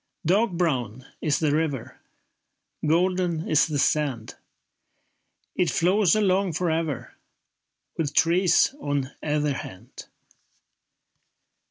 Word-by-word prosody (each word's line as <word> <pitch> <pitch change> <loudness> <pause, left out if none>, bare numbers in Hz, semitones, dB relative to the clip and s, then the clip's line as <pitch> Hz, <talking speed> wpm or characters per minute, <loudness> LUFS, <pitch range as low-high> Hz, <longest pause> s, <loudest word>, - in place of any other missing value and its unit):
Dark 200 +8 +3
brown 130 - -2 0.2
is 150 -2 +1
the 155 -3 +1
river, 150 -6 -3 0.8
Golden 175 0 +1
is 155 0 +3
the 150 -2 -2
sand. 135 -6 0 1.2
It 180 - +1
flows 185 +2 +3
along 195 -3 +1
for 170 +2 0
ever, 160 -4 -3 0.9
With 150 -3 -2
trees 175 +7 +3
on 140 -2 -2
either 150 -1 0
hand. 115 -1 -10
160 Hz, 95 wpm, -25 LUFS, 145-180 Hz, 1.2 s, Dark